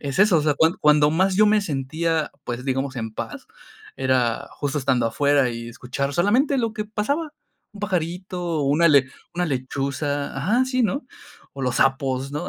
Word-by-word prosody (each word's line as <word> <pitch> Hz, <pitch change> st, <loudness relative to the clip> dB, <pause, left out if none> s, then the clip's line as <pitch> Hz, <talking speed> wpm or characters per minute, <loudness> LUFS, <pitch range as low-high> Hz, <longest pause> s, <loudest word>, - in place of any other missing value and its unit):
es 140 Hz, +3 st, -4 dB
eso. 200 Hz, -4 st, +5 dB
O -, -, 0 dB
sea, 150 Hz, -1 st, +2 dB
cuand 160 Hz, +4 st, +3 dB
cuando 150 Hz, 0 st, +5 dB
más 185 Hz, +4 st, +2 dB
yo 215 Hz, +1 st, +6 dB
me 210 Hz, 0 st, +4 dB
sentía, 155 Hz, 0 st, -2 dB
pues, 120 Hz, +1 st, -5 dB
digamos, 135 Hz, 0 st, -2 dB
en 110 Hz, -2 st, -4 dB
paz, -, -, -7 dB, 0.5 s
era 130 Hz, -3 st, 0 dB
justo 145 Hz, 0 st, -3 dB
estando 130 Hz, -4 st, +1 dB
afuera 140 Hz, +1 st, +2 dB
y 115 Hz, 0 st, -6 dB
escuchar 130 Hz, +4 st, -4 dB
solamente 250 Hz, -, +2 dB
lo 230 Hz, -3 st, 0 dB
que 215 Hz, -1 st, -4 dB
pasaba, 280 Hz, +9 st, -2 dB, 0.4 s
un 205 Hz, -, -12 dB
pajarito, 180 Hz, -3 st, -2 dB
una 150 Hz, +5 st, +3 dB
le 140 Hz, -3 st, +5 dB, 0.3 s
una 175 Hz, 0 st, 0 dB
lechuza. 140 Hz, +1 st, -3 dB
Ajá, 215 Hz, -, +2 dB
sí, 255 Hz, -1 st, 0 dB
¿no? 235 Hz, +5 st, -1 dB, 0.5 s
O 135 Hz, -, -7 dB
los 125 Hz, -1 st, 0 dB
sapos, 135 Hz, 0 st, +1 dB
¿no?, 150 Hz, -, -4 dB
150 Hz, 180 wpm, -23 LUFS, 135-190 Hz, 0.5 s, yo